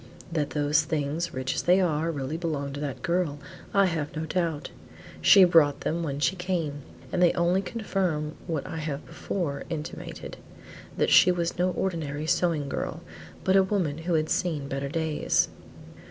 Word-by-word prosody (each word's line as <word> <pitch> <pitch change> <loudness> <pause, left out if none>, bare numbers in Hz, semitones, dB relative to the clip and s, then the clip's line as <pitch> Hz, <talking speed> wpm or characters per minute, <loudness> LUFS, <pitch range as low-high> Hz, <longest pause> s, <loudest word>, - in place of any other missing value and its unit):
"That 150 -3 0
those 145 +1 +3
things 155 +2 -2
rich 130 0 -2
as - - -1
they 180 +2 +4
are, 165 -3 +1
really 145 -1 -3
belonged 150 -5 -3
to 145 - -5
the 145 -3 -3
girl, 170 -5 0 0.3
I 200 0 +4
have 160 -5 -2
no 155 +1 -2
doubt. 165 -3 -2 0.5
She 195 - +8
brought 160 -5 +5
them 170 +2 -1
when 145 -4 -3
she 180 +5 +2
came, 175 -6 -2 0.3
and 180 - 0
they 175 - +6
only 175 +2 +2
confirm 180 -8 -2
what 160 -5 -2
I - - -5
have 150 -2 -4
before 155 -7 -3
intimated: 160 -2 -6 0.6
that - - +2
she 180 - +7
was 175 0 -2
no 180 +1 +3
ordinary 160 -6 -2
sewing 160 -3 +1
girl, 140 - -4 0.4
but 190 - +3
a 195 - +7
woman 185 -6 0
who 170 +1 0
had 155 0 0
seen 155 -6 0
better 140 0 -3
days." 160 -1 +1
160 Hz, 170 wpm, -27 LUFS, 145-180 Hz, 0.6 s, She